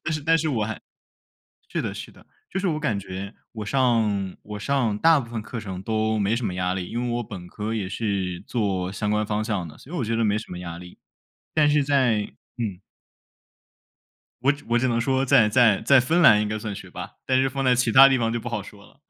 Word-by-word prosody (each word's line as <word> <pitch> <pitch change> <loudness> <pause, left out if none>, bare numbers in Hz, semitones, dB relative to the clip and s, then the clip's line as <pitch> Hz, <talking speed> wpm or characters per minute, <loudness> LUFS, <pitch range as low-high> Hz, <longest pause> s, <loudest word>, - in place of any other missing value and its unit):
但 155 - -1
是 155 - -2
但 165 +2 +3
是 160 - -1
我 115 -7 0
还 110 0 -5 0.9
是 - - -2
的 - - -3
是 - - -8
的， - - -19 0.3
就 190 - -1
是 195 - -1
我 155 -3 -1
感 110 -8 -1
觉， 95 +2 -7 0.2
我 110 -2 -6
上 110 -6 +1
我 105 0 -7
上 115 -2 0
大 165 +6 +5
部 120 -4 -7
分 115 -2 -4
课 115 +2 -6
程 95 -3 -6
都 110 +1 0
没 105 +3 +1
什 120 -1 -2
么 90 - -2
压 90 0 0
力， 90 -2 -4
因 120 - -3
为 125 - -2
我 120 - -2
本 90 -4 -9
科 105 +4 -4
也 100 -4 -2
是 95 -4 -2
做 95 -5 -1
相 105 +2 -2
关 105 0 +1
方 105 0 -1
向 105 -6 -2
的， 75 - -13
所 145 - -15
以 - - -2
我 130 - -1
觉 115 +1 -1
得 115 0 +1
没 105 0 +2
什 110 - -8
么 90 - -6
压 85 -1 -6
力， 90 0 -12 0.6
但 150 -2 +4
是 145 -1 +3
在 130 -7 +2 0.4
嗯。 100 -6 -3 1.6
我 135 +2 +4 0.2
我 120 0 +3
只 130 - +1
能 115 -1 +1
说， 130 +2 +1
在 125 -5 +5
在 110 -3 +4
在 140 -1 +5
芬 165 +8 +2
兰 105 -10 +7
应 105 - -2
该 110 - -2
算 105 -1 -5
学 - - -10
霸， - - -7 0.2
但 130 0 +3
是 135 - +2
放 135 +1 -3
在 125 -1 +4
其 125 -1 +1
他 135 +3 +9
地 135 -1 +2
方 115 -1 0
就 120 - -1
不 120 - -5
好 105 -4 -3
说 100 +1 -14
了。 135 - -21
110 Hz, 265 characters per minute, -24 LUFS, 100-130 Hz, 1.6 s, 他